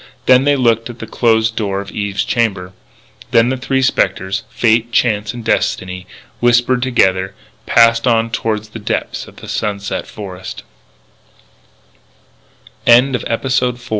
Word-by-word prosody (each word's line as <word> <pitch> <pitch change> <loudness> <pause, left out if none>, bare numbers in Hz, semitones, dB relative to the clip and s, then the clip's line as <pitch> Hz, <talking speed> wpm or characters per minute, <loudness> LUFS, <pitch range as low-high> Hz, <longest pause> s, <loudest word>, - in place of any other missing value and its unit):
Then 130 +1 +5
they 145 0 +4
looked 115 -3 +1
at 120 - -9
the 115 - -7
closed 110 -1 +1
door 100 -3 -2
of 100 0 -7
Eve's 100 -1 -2
chamber. 95 -6 -1 0.6
Then 120 0 +4
the 130 - -1
three 130 +1 -1
spectres, 95 -5 0
Fate, 115 0 +1
Chance 110 -3 +1
and 120 -2 -8
Destiny, 90 -4 -1 0.3
whispering 120 +1 +3
together, 95 -7 +1 0.3
passed 115 0 +4
on 115 -1 +2
toward 110 -2 -2
the 110 +1 -10
depths 105 - -3
of - - -15
the - - -12
sunset 100 -1 -3
f - - -15
115 Hz, 125 wpm, -16 LUFS, 100-120 Hz, 0.6 s, Then